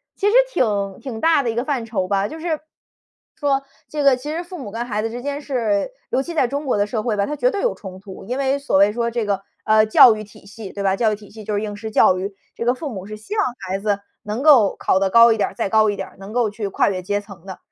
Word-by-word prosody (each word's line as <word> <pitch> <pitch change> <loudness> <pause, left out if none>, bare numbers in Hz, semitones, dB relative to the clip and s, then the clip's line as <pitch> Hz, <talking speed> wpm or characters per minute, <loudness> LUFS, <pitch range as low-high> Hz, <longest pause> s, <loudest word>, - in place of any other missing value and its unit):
其 405 - 0
实 415 - +3 0.2
挺 200 - 0
挺 235 -5 -6
大 325 -3 +4
的 235 - -1
一 225 - -2
个 240 - 0
范 265 -6 -1
畴 195 -5 -2
吧， 195 +1 +1
就 315 - -8
是 345 - -5
说 315 -2 0 1.3
这 300 -1 -3
个 275 -2 +6
其 270 +4 -7
实 335 +2 -3
父 360 +1 -9
母 250 -7 -7
跟 235 +2 -3
孩 210 -2 -2
子 225 - -2
之 240 - -6
间 285 +1 -3
是 230 - 0 0.2
尤 265 - +1
其 340 - -6
在 260 - +3
中 285 +3 -3
国 255 - +1
的 205 - +2
社 215 0 -2
会 220 -2 -1
吧， 200 0 +1
它 295 - -3
绝 - - +2
对 405 -5 -3
有 - - +1
冲 190 -2 -10
突， 195 -1 -11
因 250 +5 -3
为 275 0 +1
所 280 -8 +1
谓 200 +1 +5
说 235 +1 -1
这 230 -2 -2
个， 200 -1 -1 0.2
呃， 215 0 +5
教 220 +1 +8
育 215 - -6
体 200 -1 -17
系 205 -1 -9
对 200 - -5
吧， 190 - +3
教 220 -1 +2
育 - - -2
体 205 -1 -15
系 220 0 -11
就 215 - -4
是 205 - 0
应 210 -1 -4
试 220 +1 -6
教 185 -3 +4
育。 195 +2 -4 0.2
这 - - -4
个 245 - +3
父 295 +4 -5
母 190 -6 -7
是 215 +1 -7
希 215 - -7
望 415 - +3 0.2
孩 190 +1 -2
子 205 -1 0 0.2
能 210 +5 -3
够 260 -10 +6
考 190 - +2
得 195 -1 +1
高 230 +1 +7
一 225 - +1
点 205 - +1
儿， - - -15
再 - - -1
高 215 +1 +4
一 205 - -4
点 - - -5
儿， - - -20
能 195 +2 -9
够 235 -2 +1
去 210 -1 -4
跨 - - +1
越 185 -2 -3
阶 205 +2 -1
层 200 -4 -14
的。 190 - -8
220 Hz, 320 characters per minute, -21 LUFS, 200-260 Hz, 1.3 s, 教